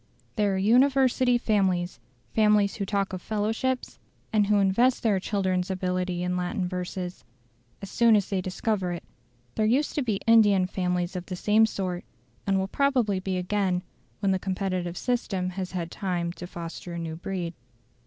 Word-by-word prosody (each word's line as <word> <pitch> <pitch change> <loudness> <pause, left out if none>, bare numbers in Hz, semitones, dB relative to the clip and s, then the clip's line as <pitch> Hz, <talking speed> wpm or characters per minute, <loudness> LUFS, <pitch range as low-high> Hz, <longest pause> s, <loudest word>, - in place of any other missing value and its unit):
There 205 -3 +1
are - - 0
University 255 +3 +4
families 190 - 0 0.3
families 210 -2 +4
who 200 -2 -3
talk 200 -1 -1
of 185 - -4
fellowships, 220 +6 -2 0.3
and 210 -2 +3
who 210 0 +4
invest 205 +6 +3
their 210 -4 +3
children's 185 -2 -1
ability 180 -1 -1
in 180 0 -1
Latin 180 +2 -1
verses, 180 - -5 0.6
as 195 - -7
soon 235 -2 +5
as 205 -3 +2
they 195 -2 -1
discover 185 0 -1
it; 170 - -6 0.5
there 215 - +1
used 270 +7 +2
to 295 - 0
be 220 -6 -1
Indian 210 -5 +5
families 180 -1 -1
of 180 -1 -5
the 185 - -4
same 215 +4 +4
sort, 185 -4 -3 0.4
and 195 0 +1
probably 255 -8 +2
will - - -4
be 190 -1 -2
again 180 -1 0 0.4
when 200 -2 +2
the 190 - +1
competitive 185 -2 -2
system 195 -7 -1
has 185 0 -5
had 170 -2 -3
time 175 -4 -2
to 175 +1 -8
foster 170 0 -7
a - - -4
new 165 -1 -4
breed. 175 0 -4
190 Hz, 170 wpm, -27 LUFS, 180-215 Hz, 0.6 s, soon